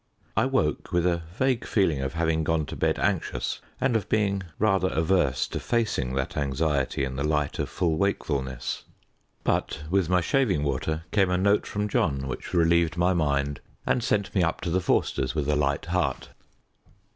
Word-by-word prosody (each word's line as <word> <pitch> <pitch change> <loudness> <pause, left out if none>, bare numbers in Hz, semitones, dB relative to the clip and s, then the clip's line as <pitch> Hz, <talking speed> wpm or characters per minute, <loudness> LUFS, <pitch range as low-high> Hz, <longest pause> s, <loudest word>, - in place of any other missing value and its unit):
I 110 +4 +3
woke 80 - 0
with 85 0 +2
a 85 -1 +1 0.2
vague 130 -3 +1
feeling 85 -10 +1
of 65 +2 -3
having 80 -1 +1
gone 80 -1 +1
to - - -7
bed - - +1
anxious, 100 -5 -1 0.2
and 130 -3 +1
of 105 -4 -1
being 100 -2 +1 0.2
rather 95 -3 +2
averse 80 -6 +1
to - - -3
facing 105 - 0
that 65 -1 -2
anxiety 70 -1 0
in 65 -1 -3
the 70 - -1
light 75 -1 0
of - - -1
full 80 -3 0
wakefulness. 70 -10 -2 0.6
But 75 - -1
with 95 -3 +2
my 90 0 +4
shaving 95 - +1
water 75 +3 -1
came 95 -3 +3
a 90 - +2
note 100 +2 +2
from 105 0 -2
John 70 -8 0
which 65 - -6
relieved 85 -1 +3
my 90 +2 +3
mind 70 -4 0 0.2
and 120 - +1
sent 105 -4 0
me 95 - +2
up 85 0 +1
to 85 - -2
the 95 +2 +2
Forsters' 65 -6 0
with 75 -3 -1
a 75 - +2
light 70 -1 0
heart. 90 +2 -1
85 Hz, 180 wpm, -26 LUFS, 70-95 Hz, 0.6 s, my